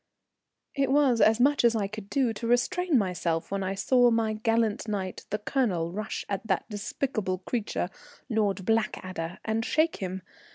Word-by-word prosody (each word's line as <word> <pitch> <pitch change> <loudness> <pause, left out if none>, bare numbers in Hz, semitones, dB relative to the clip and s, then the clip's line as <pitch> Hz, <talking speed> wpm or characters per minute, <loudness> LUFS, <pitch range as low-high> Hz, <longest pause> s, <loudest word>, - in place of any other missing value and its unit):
_] - - +1
It 270 - 0
was 275 -5 +4
as 220 +1 +5
much 280 +2 +4
as 235 -1 +4
I 210 -3 +1
could 205 0 -7
do 260 -5 +1
to 230 +2 -5
restrain 280 +7 +2
myself 175 -5 -1
when 195 0 -1
I 190 +1 -2
saw 245 +4 +4
my 225 -1 +1
gallant 225 0 0
knight, 195 -3 -4
the 210 - -1
Colonel, 205 -7 0
rush 210 +2 -4
at 200 +2 -4
that 190 -3 0
despicable 210 -2 -2
creature, 215 +4 -3 0.4
Lord 210 -5 0
Blackadder, 185 -6 -1
and 220 +1 0
shake 315 +6 +1
him. 190 -1 -5
220 Hz, 170 wpm, -28 LUFS, 195-240 Hz, 0.4 s, as